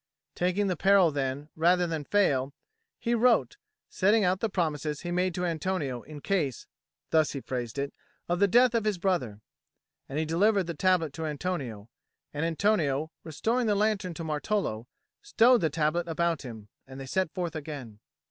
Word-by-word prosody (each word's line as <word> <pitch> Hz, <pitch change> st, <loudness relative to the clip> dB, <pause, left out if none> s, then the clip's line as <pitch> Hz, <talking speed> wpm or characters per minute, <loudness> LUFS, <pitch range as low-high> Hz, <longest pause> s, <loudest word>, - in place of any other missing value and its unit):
Taking 185 Hz, +3 st, 0 dB
the 185 Hz, -2 st, 0 dB
peril 195 Hz, -1 st, +4 dB
then, 140 Hz, +1 st, -3 dB
rather 175 Hz, +2 st, +3 dB
than 160 Hz, -3 st, -3 dB
fail, 140 Hz, -9 st, +1 dB, 0.4 s
he 235 Hz, -, -1 dB
wrote, 245 Hz, -, +3 dB, 0.3 s
setting 205 Hz, +3 st, +2 dB
out 185 Hz, 0 st, +2 dB
the 225 Hz, -, -1 dB
promises 155 Hz, -5 st, -2 dB
he 175 Hz, -, -4 dB
made 180 Hz, 0 st, 0 dB
to 180 Hz, -1 st, -1 dB
Antonio 165 Hz, -7 st, -2 dB
in 150 Hz, +2 st, -11 dB
case 155 Hz, -, -1 dB, 0.5 s
(thus 155 Hz, -2 st, +3 dB
he 140 Hz, -, -3 dB
phrased 120 Hz, -2 st, -4 dB
it) 140 Hz, 0 st, -2 dB, 0.3 s
of 175 Hz, 0 st, 0 dB
the 200 Hz, -, +5 dB
death 245 Hz, +4 st, +5 dB
of 230 Hz, -2 st, +1 dB
his 210 Hz, -3 st, +1 dB
brother. 170 Hz, -, -1 dB, 0.7 s
And 135 Hz, -, -4 dB
he 160 Hz, -, 0 dB
delivered 195 Hz, +5 st, +2 dB
the 170 Hz, 0 st, -5 dB
tablet 165 Hz, -3 st, +1 dB
to 160 Hz, +1 st, -4 dB
Antonio; 140 Hz, -, -4 dB, 0.5 s
and 150 Hz, +2 st, -2 dB
Antonio, 160 Hz, -4 st, +1 dB
restoring 230 Hz, -, -1 dB
the 210 Hz, -, +2 dB
lantern 200 Hz, -4 st, 0 dB
to 165 Hz, -, -5 dB
Martolo, 150 Hz, -, -2 dB, 0.3 s
stowed 250 Hz, -, +4 dB
the 160 Hz, -, +2 dB
tablet 155 Hz, +3 st, 0 dB
about 170 Hz, -1 st, 0 dB
him, 110 Hz, -5 st, -9 dB, 0.2 s
and 135 Hz, 0 st, -10 dB
they 135 Hz, -, -6 dB
set 185 Hz, +4 st, -1 dB
forth 175 Hz, -3 st, -4 dB
again. 140 Hz, -8 st, -7 dB
170 Hz, 175 wpm, -28 LUFS, 145-195 Hz, 0.7 s, the